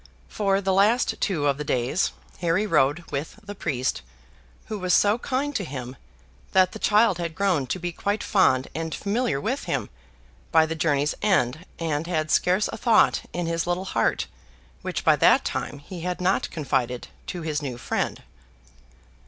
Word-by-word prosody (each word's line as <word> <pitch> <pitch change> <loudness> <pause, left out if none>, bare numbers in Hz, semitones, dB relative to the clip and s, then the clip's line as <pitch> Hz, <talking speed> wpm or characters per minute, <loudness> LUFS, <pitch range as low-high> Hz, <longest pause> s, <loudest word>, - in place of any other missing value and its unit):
For 195 -2 0
the 190 -1 +1
last 210 +6 +3
two 165 -8 0
of 140 0 +1
the - - -2
days 130 +5 0 0.3
Harry 175 +4 +1
rode 150 -3 +2
with 145 +7 -4
the 205 0 -7
priest, 130 - -2 0.6
who 215 -2 -5
was 185 -1 +2
so 210 +3 +3
kind 280 +3 -2
to 200 - 0
him, 130 -5 -6 0.6
that 185 -1 +5
the - - -8
child 210 -3 +3
had 170 -2 -3
grown 180 -9 +1
to - - -2
be 175 -1 -3
quite 205 +5 -2
fond 130 -10 +3
and 160 +1 -3
familiar 215 - -1
with 260 - -2
him - - -2 0.6
by 160 -1 +5
the 160 - -3
journey's 150 -2 +1
end, 165 -6 +1
and 160 -1 -2
had 155 -4 -1
scarce 185 +4 +3
a - - -5
thought 230 -3 +4
in 175 -1 -2
his 165 0 -1
little 175 +2 -1
heart - - 0 0.6
which - - -3
by - - +6
that - - +5
time - - -3
he 170 +5 -9
had 180 +1 -3
not 185 +2 +1
confided 130 -6 -2 0.2
to 175 -2 -5
his 155 -2 -2
new 130 -4 -4
friend. - - -2
170 Hz, 175 wpm, -25 LUFS, 145-200 Hz, 0.6 s, by